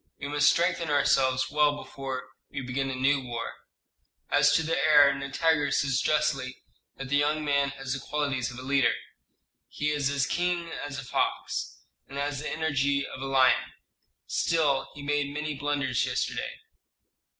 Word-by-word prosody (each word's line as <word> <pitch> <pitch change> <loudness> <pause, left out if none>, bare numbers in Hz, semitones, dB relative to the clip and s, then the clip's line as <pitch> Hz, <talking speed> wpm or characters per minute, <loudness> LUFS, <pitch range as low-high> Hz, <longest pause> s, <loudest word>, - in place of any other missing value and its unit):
We 145 - -4
must 145 0 +4
strengthen 170 -1 +1
ourselves 130 -3 +2
well 150 0 +3
before 135 -3 -6 0.3
we 135 - -5
begin 135 +1 -2
a 130 - -3
new 135 +2 +2
war. 120 -2 -5 0.8
As - - +5
to 160 - +3
the 165 +1 0
heir, 145 -2 +6
Nitager 145 +2 +1
says 135 -2 +1
justly 135 -4 0 0.3
that 135 -1 -7
the 145 - +3
young 150 +1 +1
man 140 -1 +2
has 135 -1 -4
the 135 - -3
qualities 135 -3 -2
of 120 - -9
a 130 - -7
leader: 135 - +2 0.7
he 150 0 -2
is 145 -2 0
as 140 -1 +1
keen 175 +1 -1
as 145 -3 -6
a 135 - -5
fox, - - -2 0.2
and 140 - -8
has 140 0 -2
the 150 - -4
energy 140 -3 0
of 130 - -8
a - - -3
lion. 130 -3 +3 0.5
Still 150 -5 +1
he 145 - -9
made 145 0 0
many 150 +1 -3
blunders 140 -3 -1
yesterday." - - -2
140 Hz, 165 wpm, -27 LUFS, 135-150 Hz, 0.8 s, heir